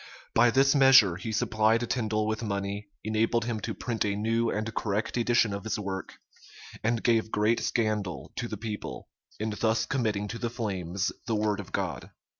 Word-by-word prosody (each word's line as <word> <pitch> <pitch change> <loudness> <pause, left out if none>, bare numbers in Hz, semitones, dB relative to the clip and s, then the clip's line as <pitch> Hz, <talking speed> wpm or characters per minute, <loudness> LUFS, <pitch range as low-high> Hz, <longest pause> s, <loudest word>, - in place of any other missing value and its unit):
By 120 +1 +5
this 135 +3 +4
measure 130 - +7
he 95 +5 -5
supplied 110 +2 +2
Tindal 110 -3 0
with 110 +1 -2
money, 100 -1 -3
enabled 110 +1 +1
him 115 -2 -2
to - - -4
print 115 -2 -2
a 100 -1 0
new 115 +2 +1
and 110 +1 -2
correct 105 0 -1
edition 120 -3 +2
of 100 -1 -5
his 110 -2 -2
work, 95 -2 -5 0.7
and 115 +1 0
gave 115 -2 +2
great 110 +2 +2
scandal 105 -7 -1
to - - -2
the - - -5
people, 105 -2 -6 0.3
in 110 +1 -1
thus 110 +1 +1
committing 110 -6 -1
to 115 - -5
the 120 - -1
flames 100 -5 -2 0.2
the 115 - +1
word 105 -1 0
of 100 -2 -8
God. 85 -9 -3
110 Hz, 180 wpm, -28 LUFS, 105-115 Hz, 0.7 s, measure